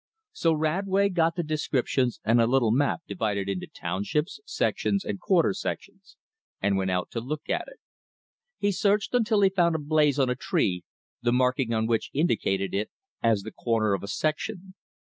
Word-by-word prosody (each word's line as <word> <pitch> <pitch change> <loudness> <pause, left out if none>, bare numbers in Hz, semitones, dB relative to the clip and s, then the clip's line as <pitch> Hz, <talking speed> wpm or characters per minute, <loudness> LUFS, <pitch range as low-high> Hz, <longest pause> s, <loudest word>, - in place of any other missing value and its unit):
So 165 - +1
Radway 190 +6 +1
got 165 -1 +2
the 175 - -1
"descriptions" 135 -5 0
and 115 +2 +4
a 115 - +3
little 120 -3 +3
map 140 +7 +1
divided 100 0 -2
into 95 -2 -3
townships, 105 - -3
sections, 200 - 0
and 200 - -3
quarter 185 +1 +3
sections; 195 0 -6 0.4
and 100 0 +1
went 95 -1 0
out 90 -1 -1
to 115 - -2
look 150 +5 -5
at - - -1
it. - - -13 0.8
He 205 - +1
searched 205 +3 +1
until 225 -3 +3
he 195 - +6
found 170 -3 +2
a - - +2
"blaze" 150 -1 +2
on 135 -2 +3
a - - 0
tree, 90 -7 0 0.4
the 120 - +1
marking 125 0 +1
on 110 -1 +1
which 115 -1 0
indicated 100 - 0
it 105 +2 -1 0.3
as 110 -4 +2
the 110 - -7
corner 110 -3 0
of 100 - -1
a 100 - -6
section. 185 - -3
140 Hz, 180 wpm, -27 LUFS, 110-180 Hz, 0.8 s, he